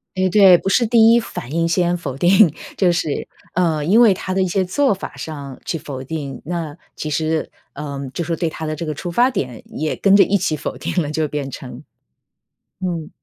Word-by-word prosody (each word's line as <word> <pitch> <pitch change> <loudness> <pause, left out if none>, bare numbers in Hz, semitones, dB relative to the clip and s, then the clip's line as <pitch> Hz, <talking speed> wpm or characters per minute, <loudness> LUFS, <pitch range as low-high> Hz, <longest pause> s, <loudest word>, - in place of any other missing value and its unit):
诶， 185 0 +1
对， 190 -2 +7
不 - - -6
是 235 +5 +3
第 225 0 +6
一 235 - +4
反 130 - -7
应 165 0 +1
先 175 +1 +1
否 135 -6 -6
定， 180 +1 +5 0.2
就 185 -3 +3
是， 170 -4 -2 0.2
呃， 165 -4 +1
因 215 +8 +5
为 225 -5 +6
他 185 0 -4
的 190 - +2
一 185 - 0
些 190 +1 0
做 270 +8 +2
法 195 - -7
上 140 -4 -7
去 165 - -2
否 135 -4 -7
定， 140 -2 -6
那 165 -2 -4 0.2
其 155 - -4
实， 155 +1 -1 0.2
呃， 140 -1 -6 0.2
就 - - -3
说 165 0 -1
对 165 -1 -1
他 160 - -6
的 155 0 -3
这 165 +2 -5
个 155 - -3
出 175 +4 -6
发 245 +9 +3
点 125 - -4
也 155 0 -3
跟 195 - +3
着 200 - +8
一 200 - +2
起 155 -3 -1
否 - - -5
定 180 - -1
了 150 - -3
就 155 +1 -1
变 140 -2 -3
成， 130 -1 -9 1.0
嗯。 170 -4 -3
170 Hz, 235 characters per minute, -20 LUFS, 150-185 Hz, 1.0 s, 着